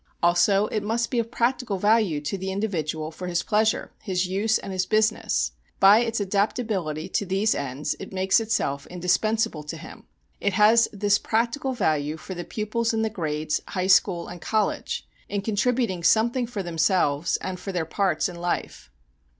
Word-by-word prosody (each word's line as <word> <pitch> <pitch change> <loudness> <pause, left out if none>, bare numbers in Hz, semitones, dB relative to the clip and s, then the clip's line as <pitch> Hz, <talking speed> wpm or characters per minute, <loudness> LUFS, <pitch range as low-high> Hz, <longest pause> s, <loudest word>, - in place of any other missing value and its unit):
Also 185 +4 +4
it 215 - -1
must 230 +3 -1
be 245 - +1
of 230 0 -2
practical 235 -3 0
value 205 -5 +2
to 145 +6 -3
the 190 0 -4
individual 160 -6 -2
for 180 +3 -7
his 175 -1 0
pleasure, 215 +1 +1
his 185 -2 -1
use, 200 +4 +1
and 195 - -7
his 185 0 -1
business; 215 - +1 0.3
by 200 +3 +7
its 230 -1 -1
adaptability 200 -5 -1
to - - -1
these 195 +3 +1
ends 140 +2 -3
it 195 - -8
makes 190 +2 +2
itself 140 -11 -1
indispensable 180 0 0
to 150 +2 -7
him. 160 - -12 0.3
It 200 - 0
has 220 +3 +5
this 205 0 +2
practical 235 +4 -1
value 155 - 0
for 185 - -8
the 175 -1 -5
pupils 225 +4 -2
in 220 - +1
the 220 - -1
grades, 155 -5 -2
high 185 -1 -2
school, 190 -2 +3
and 175 -1 -9
college, 215 -1 -1 0.2
in 200 -1 -2
contributing 220 -2 0
something 235 +6 +3
for 220 -5 -4
themselves 165 -3 +1
and 185 -1 -5
for 195 - -5
their 175 -3 -1
parts 175 -1 0
in 180 -2 -8
life. 175 - -3
195 Hz, 175 wpm, -25 LUFS, 175-220 Hz, 0.3 s, by